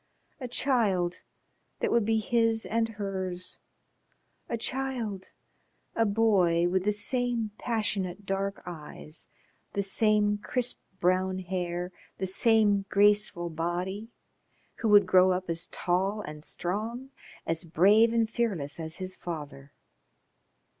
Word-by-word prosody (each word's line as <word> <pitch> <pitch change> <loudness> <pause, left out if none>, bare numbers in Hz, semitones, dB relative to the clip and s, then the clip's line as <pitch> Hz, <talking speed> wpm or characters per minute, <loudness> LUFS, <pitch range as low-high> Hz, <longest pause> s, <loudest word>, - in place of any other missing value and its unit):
A 255 - -4
child 215 -9 +1 0.6
that - - 0
would 235 -3 +3
be 225 +1 +2
his 225 0 +1
and 225 0 0
hers, 190 -4 -4 0.9
a 235 - -1
child 235 -6 -2 0.7
a 225 -1 +3
boy 195 -6 +3
with 185 +1 0
the 210 - +3
same 235 +1 0
passionate 205 -4 -1
dark 195 +1 -2
eyes, 155 -2 -7 0.5
the 200 - 0
same 210 +1 +2
crisp 250 +3 -2 0.2
brown 185 +1 +2
hair, 180 -1 -3 0.3
the 190 - -2
same 205 0 +3
graceful 205 -4 +3
body, 180 +6 -3 0.7
who 225 - 0
would 205 -1 +7
grow 185 0 +5
up 185 +1 -3
as 165 +1 -3
tall 190 +4 0
and 150 -4 -8
strong, 225 +12 -4 0.3
as 165 +1 -1
brave 200 +7 +5
and 230 -1 +2
fearless 195 -13 -1
as 160 0 -4
his 185 0 -4
father. 145 -5 -7
195 Hz, 120 wpm, -28 LUFS, 180-225 Hz, 0.9 s, would